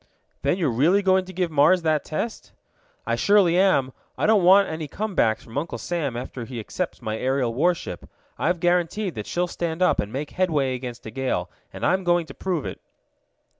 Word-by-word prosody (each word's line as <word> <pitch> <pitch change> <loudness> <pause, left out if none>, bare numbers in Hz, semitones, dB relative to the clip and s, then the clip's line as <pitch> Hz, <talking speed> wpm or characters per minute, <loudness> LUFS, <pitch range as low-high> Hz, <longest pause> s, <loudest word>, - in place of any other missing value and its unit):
"Then 180 - +1
you're 160 -8 +1
really 165 - +3
going 190 -1 +3
to 185 - -9
give 180 -2 -2
the - - -12
Mars 165 +5 +5
that 155 -2 +1
test?" 220 +9 -5 0.5
"I - - 0
surely 200 -4 +4
am. 180 -9 +3 0.2
I - - 0
don't 210 -3 +4
want 195 +2 +6
any 160 -1 -4
comebacks 180 - 0
from 115 +5 -4
Uncle 165 +3 -5
Sam 150 -8 -3
after 125 0 -6
he 120 0 -7
accepts 150 - -5
my 110 -1 -3
aerial 130 -2 0
warship. 170 +7 -1 0.3
I've 175 +2 +1
guaranteed 175 +3 +1
that 105 -4 -6
she'll 175 +1 0
stand 170 0 -2
up - - +3
and 105 - -2
make 145 +4 -4
headway 150 -8 +1
against 125 -1 -7
a 110 - -6
gale, 115 -8 -2 0.2
and - - -4
I'm 185 +1 +2
going 175 -1 +2
to - - -11
prove 180 -6 -2
it." - - -6
165 Hz, 200 wpm, -24 LUFS, 130-185 Hz, 0.5 s, want